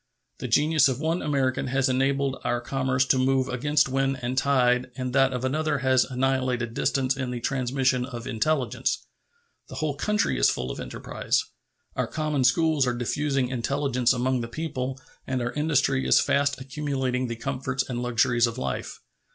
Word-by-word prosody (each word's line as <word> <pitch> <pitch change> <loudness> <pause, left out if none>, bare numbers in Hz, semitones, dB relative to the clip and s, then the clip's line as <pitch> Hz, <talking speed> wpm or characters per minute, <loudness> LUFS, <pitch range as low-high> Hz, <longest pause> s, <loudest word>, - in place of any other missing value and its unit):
The - - -4
genius 145 +4 +4
of 130 -1 -2
one 160 +3 0
American 135 -3 0
has 135 +1 +1
enabled 135 +1 0
our 120 - 0
commerce 130 +1 0
to 130 - +2
move 130 0 +2
against 145 +4 +1
wind 135 0 0
and 125 +2 -2
tide 130 -2 +2
and 130 -1 -4
that 135 -1 +4
of 125 0 -3
another 155 +2 0
has 130 -1 +4
annihilated 130 -2 -1
distance 130 +2 0
in 130 -2 -3
the 125 -1 -4
transmission 130 0 0
of 120 -4 -7
intelligence. 130 0 -1 0.6
The - - -8
whole 155 -2 -1
country 210 +8 0
is - - +5
full - - -2
of - - -7
enterprise. - - -2 0.5
Our - - -1
common 155 -3 -1
schools 150 +1 +3
are 120 - 0
diffusing 135 +1 -1
intelligence 130 0 0
among 130 0 0
the 115 - -4
people 130 -1 -4 0.3
and 130 -1 -1
our 120 0 -2
industry 145 -3 +1
is - - +6
fast 140 -1 +1
accumulating 130 -2 -2
the 115 - -4
comforts 130 +1 -3
and 120 -2 -3
luxuries 120 0 +2
of 115 +1 -5
life. 130 - -4
130 Hz, 170 wpm, -26 LUFS, 125-140 Hz, 0.6 s, is